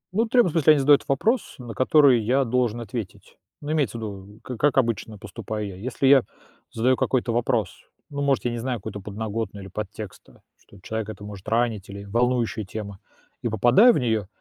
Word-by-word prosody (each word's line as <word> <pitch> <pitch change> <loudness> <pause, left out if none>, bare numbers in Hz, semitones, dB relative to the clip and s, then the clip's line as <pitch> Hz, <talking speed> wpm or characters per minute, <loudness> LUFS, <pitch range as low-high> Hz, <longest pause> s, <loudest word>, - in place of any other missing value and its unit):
Ну, 225 - +3
требуют- 230 -7 +3
в - - -12
смысле, 155 -2 +5
они 145 - +2
задают 145 +1 +5
вопрос, 220 - 0
на 120 -3 -8
который 130 -3 +5
я 130 +5 +2
должен 120 -1 0
ответить. 110 -3 -7 0.3
Ну, 145 +1 -4
имеется 140 -8 0
в 115 - -7
виду, 100 0 -8
как 125 -3 -7
как 145 -1 +2
обычно 115 -4 0
поступаю 105 +1 -6
я. 95 - -8
Если 120 +7 -3
я 135 -1 +7 0.5
задаю 125 +3 +2
какой-то 125 -2 0
вопрос, 120 0 0 0.4
ну, 140 0 -4
может, 140 -3 +1
я 120 - +1
не 120 - -4
знаю 125 +1 -2
какую-то 100 -1 -7
подноготную 105 0 -5
или 95 - -11
подтекста, 105 0 -8 0.2
что 100 - -19
человека 110 +2 -4
это 105 - -13
может 100 -2 -10
ранить 115 -4 0
или 100 0 -8
волнующая 120 +1 0
тема, 100 0 -7 0.4
и 120 - -1
попадая 120 - +6
в - - +1
нее, 110 -6 0
115 Hz, 195 wpm, -24 LUFS, 105-130 Hz, 0.5 s, я